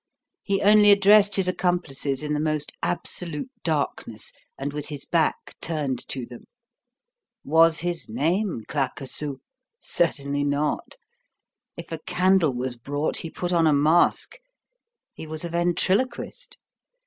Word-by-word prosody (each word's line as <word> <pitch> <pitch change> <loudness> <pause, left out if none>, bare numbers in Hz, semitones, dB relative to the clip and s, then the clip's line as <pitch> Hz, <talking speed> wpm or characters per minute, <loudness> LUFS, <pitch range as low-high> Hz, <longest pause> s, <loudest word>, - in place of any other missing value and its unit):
He 195 -1 -1
only 210 0 +7
addressed 205 0 +6
his 190 -2 +3
accomplices 155 -7 -1
in 150 0 -2
the 150 - 0
most 155 -1 -1
absolute 175 - -3
darkness, 145 -8 -2 0.2
and 140 +1 -4
with 150 -1 -4
his 145 -3 -6
back 165 -2 0
turned 145 -6 -2
to 130 -3 -4
them. 120 0 -12 1.0
Was 160 +2 +4
his 175 -1 -3
name 160 - 0
Claquesous? 140 0 -3 0.4
Certainly 145 -4 -1
not. 145 +1 -1 0.8
If 170 0 -9
a 165 - -4
candle 180 -4 +2
was 125 0 -3
brought, 145 +5 -2
he 165 - -4
put 175 +2 -3
on 165 -2 +4
a 155 - +4
mask. 160 - +3 0.8
He 160 - -9
was 155 +2 -4
a - - -4
ventriloquist. 190 - -1
160 Hz, 130 wpm, -25 LUFS, 145-180 Hz, 1.0 s, only